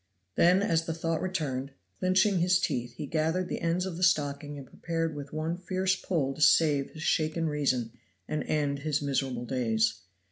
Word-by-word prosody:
Then 180 - +4
as 165 -4 +1
the 165 - -3
thought 165 0 -1
returned, 140 -7 -3 0.3
clinching 185 +1 +3
his 180 +1 +3
teeth, 125 -8 -2
he - - -5
gathered 160 +5 0
the - - -3
ends 170 +2 0
of 180 -3 -5
the - - -7
stocking 145 -4 +1
and 140 - -8
prepared 165 +3 -3
with 145 -1 -7
one 155 +2 -2
fierce 185 +1 0
pull 150 -9 -1
to 155 - -9
save 150 -3 +4
his 155 - -9
shaken 160 +1 +1
reason 130 -6 0 0.4
and 155 -1 -2
end 145 -2 0
his 150 0 0
miserable 135 -3 -1
days. 115 -4 0
155 Hz, 180 wpm, -29 LUFS, 140-170 Hz, 0.4 s, Then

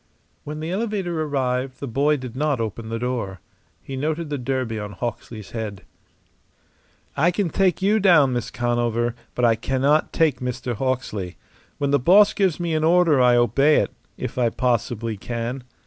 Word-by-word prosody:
When 150 +1 -6
the 160 +2 -4
elevator 190 -5 -2
arrived 130 -3 -1
the 140 - -5
boy 140 +5 +2
did 130 -3 -8
not 145 -1 0
open 110 0 -4
the 115 - -2
door. 115 -6 -3 0.4
He 135 - -6
noted 155 +3 -2
the 145 - -1
derby 125 -3 -2
on 105 0 -6
Hawksley's 110 0 -6
head. 105 -4 -5 1.3
"I 155 +5 +3
can 180 -1 -1
take 190 -1 +1
you 210 +3 +3
down, 160 -10 +5
Miss 120 -1 -2
Conover, 120 -1 0 0.2
but 125 - +2
I 115 - +5
cannot 135 +6 +1
take 155 -6 +2
Mr. 125 -1 -3
Hawksley. 110 -7 -3 0.4
When 140 -1 -1
the 145 - +4
boss 195 +10 +6
gives 190 -5 +1
me 170 -2 -1
an 155 0 0
order 165 -4 +4
I 125 -1 +5
obey 135 +6 +4
it - - +1 0.3
if - - -4
I 120 -2 +3
possibly 115 -2 -1
can. 120 +4 -4
130 Hz, 170 wpm, -23 LUFS, 120-155 Hz, 1.3 s, boss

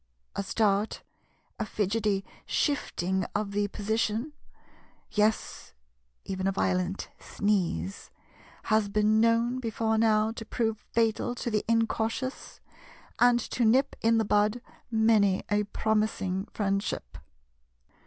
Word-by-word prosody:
A - - -1
start, 205 +1 0 0.6
a - - 0
fidgety 205 -1 0 0.2
shifting 190 - 0
of 205 -1 -1
the 205 0 0
position, 220 +6 -1 0.8
yes, 215 +1 0 0.5
even 190 0 -2
a - - +2
violent 185 0 -1
sneeze, 175 - -1 0.5
has 215 -1 +2
been 215 +1 +3
known 230 +2 +2
before 225 -2 0
now 220 -1 +3
to 225 - -7
prove 225 -1 -1
fatal 230 +1 0
to 235 - -3
the 210 -1 +1
incautious, 230 +3 -1 0.6
and 245 0 +5
to 245 - 0
nip 250 +5 +3
in 225 0 +3
the 220 - +2
bud 210 +3 +2 0.3
many 220 -4 +3
a 205 0 +2
promising 210 -3 -1
friendship. 195 - -2
215 Hz, 115 wpm, -28 LUFS, 200-225 Hz, 0.8 s, and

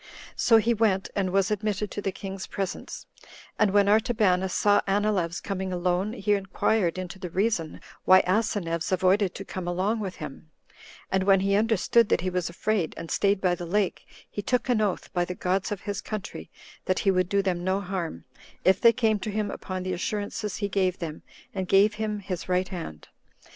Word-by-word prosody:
So 230 - +5
he 230 +2 +3
went, 205 -4 +1
and 195 -2 0
was 195 +2 +1
admitted 210 -1 -1
to 205 - -4
the 195 - -1
king's 195 0 -7
presence; 195 -2 -5 0.5
and 215 - +4
when 200 0 +4
Artabanus 205 -4 +2
saw 205 +2 +3
Anileus 195 -4 +1
coming 190 -1 -4
alone, 180 +3 0
he 210 -3 0
inquired 195 -2 0
into 185 +1 -6
the 180 -2 -5
reason 185 -4 -1 0.2
why 185 0 +7
Asineus 185 -4 -1
avoided 185 +1 +2
to 195 - -7
come 185 -2 -6
along 190 +6 0
with 195 -3 -4
him; 150 +1 -9 0.6
and 190 0 +1
when 195 -1 +5
he 195 +1 +1
understood 225 +1 +3
that - - +2
he 185 +1 -2
was 180 -1 -1
afraid, 185 0 -1
and 165 0 -7
staid 200 -1 +2
by 185 -2 +2
the 175 0 -5
lake, 200 +2 -1 0.2
he 205 - -5
took 250 +5 0
an 235 -3 +3
oath, 205 -3 -2
by 175 - +1
the 180 +1 -5
gods 190 +4 -1
of 205 - -3
his 200 -2 -4
country, 215 -3 -6 0.4
that 185 - +1
he 195 - +5
would 185 -1 +1
do 200 0 +2
them 180 -2 -1
no 190 +2 +1
harm, 180 - -4 0.4
if 190 +1 +4
they 230 0 +7
came 220 -4 +1
to 215 - -4
him 210 0 -2
upon 185 -1 -5
the 185 0 -2
assurances 205 +3 -3
he 205 - -2
gave 185 -2 0
them, 160 -3 -6 0.3
and 190 -2 -3
gave 200 +3 +5
him 210 -1 -1
his 185 -2 -5
right 185 +1 +1
hand. 165 - -7
195 Hz, 195 wpm, -26 LUFS, 180-210 Hz, 0.6 s, why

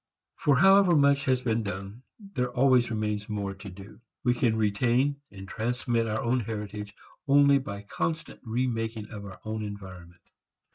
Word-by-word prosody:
For 145 -3 +3
however 195 +2 +6
much 140 -1 +4
has 130 -1 +2
been 115 -1 +1
done, 100 +2 -6 0.3
there 125 -1 0
always 125 -1 +3
remains 105 -2 -2
more 100 -2 -3
to 95 +1 -10
do. 100 +5 -13 0.2
We 125 - +3
can 120 -2 +1
retain 120 +7 +1
and 95 -1 -10
transmit 115 +2 -1
our 110 0 -2
own 125 +2 +1
heritage 105 -2 -6 0.3
only 140 0 +6
by 100 -6 -7
constant 160 +10 -3
remaking 115 -2 -2
of 105 -2 -7
our 100 -2 -10
own 110 0 -3
environment. 95 -4 -9
115 Hz, 155 wpm, -28 LUFS, 105-130 Hz, 0.3 s, however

